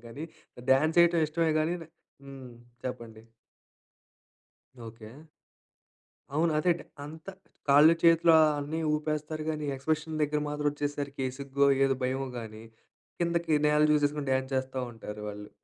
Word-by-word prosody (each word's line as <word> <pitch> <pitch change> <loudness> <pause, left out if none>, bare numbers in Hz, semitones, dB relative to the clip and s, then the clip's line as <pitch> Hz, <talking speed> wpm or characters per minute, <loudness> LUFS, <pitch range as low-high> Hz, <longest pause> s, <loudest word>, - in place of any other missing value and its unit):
గానీ 140 +7 -7 0.5
డాన్స్ 155 +5 +3
చేయడం 170 -1 +4
ఇష్టమే 160 0 0
కానీ 165 +3 0 0.5
హ్మ్. 135 -2 -10 0.4
చెప్పండి. 115 -3 -7 1.6
ఓకె. 110 -1 -11 1.2
అవును. 160 +1 +2
అదే. 175 +3 +3 0.3
అంత 160 +3 -11 0.4
కాళ్ళు, 150 +4 +7
చేతులు 165 0 +5
ఆ - - +6 0.2
అన్ని 150 +3 -3
ఊపేస్తారు 155 0 -3
గాని 150 -1 -4
ఎక్స్‌ప్రెషన్స్ 155 +3 -2
దగ్గర 150 0 0
మాత్రం 150 0 -3
వచ్చేసరికి, 145 -2 -4
సిగ్గో, 140 0 +1 0.2
ఏదో 135 0 +2
భయమో 130 +1 -1
గాని 110 -1 -9 0.6
కిందకి 170 -2 0
నేల 150 0 +3
చూసేసుకొని 145 -1 0
డాన్స్ 130 0 -1
చేస్తా 130 0 -2
ఉంటారు 105 -1 -9
వాళ్ళు! 105 0 -9
145 Hz, 125 wpm, -29 LUFS, 130-155 Hz, 1.6 s, కాళ్ళు